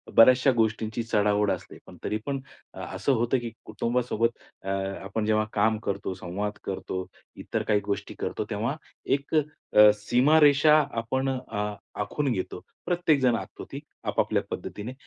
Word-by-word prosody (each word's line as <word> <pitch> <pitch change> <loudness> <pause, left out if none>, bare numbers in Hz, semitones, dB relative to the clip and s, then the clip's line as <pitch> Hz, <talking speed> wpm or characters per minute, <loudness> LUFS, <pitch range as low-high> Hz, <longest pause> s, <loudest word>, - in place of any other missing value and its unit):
बऱ्याचशा 130 +3 +7
गोष्टींची 110 0 0
चढाओढ 105 -2 +2
असते. 90 - -5
पण - - -13
तरीपण 125 +6 -2 0.3
असं 140 - -1
होतं 120 +2 +2
की 120 -1 -5
कुटुंबासोबत 115 +1 0 0.3
अ, 95 - -5 0.3
आपण 105 +2 -2
जेव्हा 110 0 +2
काम 110 +1 +2
करतो, 100 -1 -2
संवाद 100 +3 -4
करतो, 95 -1 -4 0.3
इतर - - -3
काही 105 -1 +2
गोष्टी 100 -1 -3
करतो - - -2
तेव्हा - - -1 0.4
एक 140 +3 -6
अ, 145 -8 +4
सीमारेषा 145 +7 +5 0.2
आपण 130 +4 -1
अ, 115 -5 -3 0.3
आखून 135 +7 -1
घेतो. 95 -5 -3 0.2
प्रत्येकजण 155 -9 +3
आखतो - - -6
ती - - -5 0.2
आपापल्या - - +1
पद्धतीने. 110 +5 -5
115 Hz, 135 wpm, -27 LUFS, 105-130 Hz, 0.4 s, बऱ्याचशा